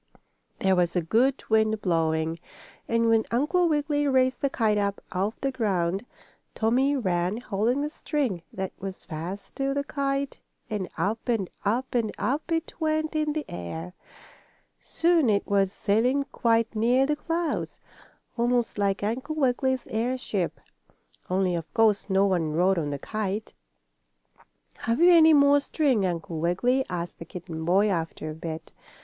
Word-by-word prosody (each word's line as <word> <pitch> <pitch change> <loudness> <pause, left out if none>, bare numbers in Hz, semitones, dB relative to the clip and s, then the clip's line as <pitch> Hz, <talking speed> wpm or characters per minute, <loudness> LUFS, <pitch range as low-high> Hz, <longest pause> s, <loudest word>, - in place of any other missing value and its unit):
There 190 -1 +2
was 175 -1 +1
a 180 - +2
good 245 +11 +2
wind 220 0 +2
blowing, 160 -2 0 0.5
and 230 0 +2
when 225 -1 +4
Uncle 320 +8 +2
Wiggily 290 -1 +1
raised 260 -1 +2
the 280 - +2
kite 215 -5 +1
up 200 0 -1
off 200 +3 -2
the 275 - 0
ground, 195 -4 -1 0.5
Tommie 255 +6 +2
ran, 185 -3 0
holding 235 +3 0
the 295 - -1
string 275 - -2
that 190 -1 -4
was 190 -1 -7
fast 180 +5 -7
to 275 0 0
the 280 - 0
kite 275 -1 -2 0.3
and 200 -4 -2
up 220 +5 -2
and 215 -6 0
up 240 +6 -1
and 230 -3 +1
up 295 +5 -2
it 325 0 -1
went 310 0 0
in 305 -1 +1
the 310 0 -3
air. 160 - -6 0.9
Soon 330 -6 +2
it 200 -1 +2
was 195 -2 +2
sailing 235 +8 +1
quite 230 -1 +1
near 245 +5 +3
the 300 +2 +1
clouds, 330 +1 -2 0.6
almost 240 -2 +1
like 200 -1 0
Uncle 255 +9 -2
Wiggily's 260 -2 +1
airship, 225 -5 -2 0.7
only, 185 -1 +1
of 165 -2 -4
course, 220 -3 +3
no 195 +1 +4
one 170 -6 0
rode 180 +3 +3
on 150 -3 -2
the 140 - -3
kite. 215 +5 -4 1.2
"Have 230 +1 -1
you 350 +1 +7
any 320 -2 +7
more 285 0 +6
string, 275 - +1
Uncle 165 -2 -4
Wiggily?" 240 +11 +1
asked 175 -1 -4
the - - -6
kitten 165 -1 -7
boy, 195 +5 +4
after 165 -4 -2
a - - -6
bit. 160 0 -7
220 Hz, 155 wpm, -26 LUFS, 185-270 Hz, 1.2 s, you